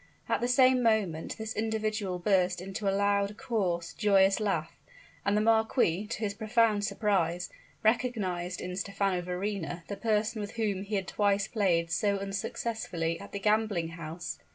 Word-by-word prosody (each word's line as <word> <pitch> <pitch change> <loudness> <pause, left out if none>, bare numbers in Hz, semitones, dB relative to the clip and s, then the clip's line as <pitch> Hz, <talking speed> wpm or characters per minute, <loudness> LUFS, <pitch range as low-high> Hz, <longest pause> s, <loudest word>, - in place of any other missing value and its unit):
At - - 0
the 240 - +1
same 255 0 +5
moment 210 -9 +1
this 220 -1 -4
individual 215 -3 -1
burst 180 -1 +2
into 195 +2 -3
a 195 - +1
loud, 200 0 +1
coarse, 190 -10 -1
joyous 195 -1 +4
laugh; 165 -6 -1 0.5
and 200 +1 +2
the - - +3
marquis, 220 -4 +2
to 225 - -4
his 205 -2 -1
profound 220 -1 +2
surprise, 180 -5 0 0.3
recognized 205 -6 0
in 180 0 -4
Stephano 195 -1 -1
Verrina 180 -1 -3
the 200 - -3
person 215 +1 0
with 205 0 -6
whom 210 -4 -1
he 205 +1 -3
had 195 -2 -1
twice 200 -1 +1
played 170 -6 +1
so 200 +4 +1
unsuccessfully 195 -4 -3
at - - -10
the - - -4
gambling 210 -4 +1
house. 165 +1 -6
200 Hz, 155 wpm, -30 LUFS, 180-215 Hz, 0.5 s, same